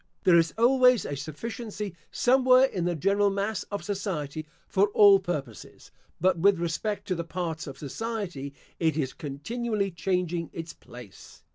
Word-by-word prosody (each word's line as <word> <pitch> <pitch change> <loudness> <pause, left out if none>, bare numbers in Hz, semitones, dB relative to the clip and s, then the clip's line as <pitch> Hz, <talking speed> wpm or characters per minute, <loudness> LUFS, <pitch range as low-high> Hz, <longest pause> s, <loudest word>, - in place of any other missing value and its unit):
There 170 -2 +6
is 165 -2 +1
always 250 0 +5
a 145 - -3
sufficiency 205 - -6 0.2
somewhere 255 +1 +5
in 185 -9 -3
the 175 -1 0
general 200 +5 +2
mass 200 0 -2
of 205 -1 -4
society 160 -7 -4 0.2
for 200 +2 +3
all 200 -2 +8
purposes; 145 - -6 0.3
but 185 -2 +2
with 200 +2 +4
respect 175 +5 -3
to - - +2
the 170 -1 -3
parts 165 -2 -4
of 135 -1 -8
society, 175 - -5 0.3
it 160 -3 +1
is 135 -4 -1
continually 200 - -3
changing 175 0 -2
its 165 0 -6
place. 120 -5 -14
180 Hz, 150 wpm, -27 LUFS, 160-210 Hz, 0.3 s, all